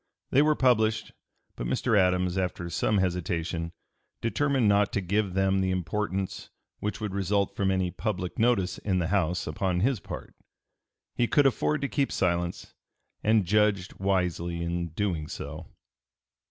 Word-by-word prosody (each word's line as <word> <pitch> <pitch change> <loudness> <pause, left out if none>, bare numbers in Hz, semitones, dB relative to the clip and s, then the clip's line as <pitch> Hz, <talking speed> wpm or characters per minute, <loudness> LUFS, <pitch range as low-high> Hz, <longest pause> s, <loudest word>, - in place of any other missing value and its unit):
They 140 - +5
were 150 0 +4
published, 110 -5 +2 0.4
but - - -4
Mr. 110 - +1
Adams, 90 -2 +3
after 90 -2 -2
some 105 - +1
hesitation, 85 -2 -1 0.5
determined 135 0 +1
not 100 0 +3
to - - +1
give 100 +1 0
them 95 0 +2
the 95 - +1
importance 95 +2 -2 0.3
which 105 - -3
would 105 -3 -3
result 100 0 0
from 100 -1 +1
any 95 -2 +1
public 90 -4 -3
notice 110 -5 +2
in 95 -3 0
the 85 -2 0
House 90 -3 +1
upon 90 +3 -1
his 125 +1 +2
part. - - -8 0.8
He 120 - +1
could 145 +3 +4
afford 140 +3 +2
to 140 - 0
keep 140 0 0
silence, 85 -1 -1 0.5
and 110 -2 +3
judged 100 0 +1
wisely 90 -3 0
in 85 0 -2
doing 85 -2 -2
so. - - -7
95 Hz, 150 wpm, -28 LUFS, 90-105 Hz, 0.8 s, They